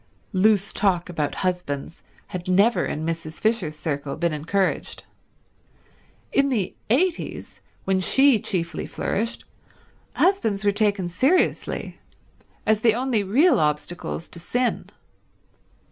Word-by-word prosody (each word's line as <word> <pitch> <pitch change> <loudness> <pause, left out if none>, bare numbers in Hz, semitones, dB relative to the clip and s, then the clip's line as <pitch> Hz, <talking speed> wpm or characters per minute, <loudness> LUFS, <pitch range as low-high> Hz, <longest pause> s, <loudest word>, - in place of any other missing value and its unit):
Loose 200 +1 +3
talk 185 -4 +1
about 150 -4 -2
husbands 170 -4 -3 0.3
had 180 -1 -6
never 200 +6 +3
in 155 +1 -3
Mrs. 165 -1 -4
Fisher's 190 -7 -1
circle 145 -3 -3
been 170 -1 0
encouraged. 180 +6 -1 1.3
In 275 0 +3
the 215 -8 -1
'eighties, 330 +9 -1 0.2
when 190 0 +2
she 265 +5 +4
chiefly 170 -4 -3
flourished, 225 +4 -3 0.7
husbands 225 - +1
were 205 - +5
taken 200 -3 +1
seriously, 265 - 0 0.7
as 220 -1 +2
the 225 -1 +4
only 245 -3 +1
real 265 - +4
obstacles 155 +2 -2
to 170 - -9
sin. 245 +8 -1
195 Hz, 115 wpm, -24 LUFS, 170-230 Hz, 1.3 s, were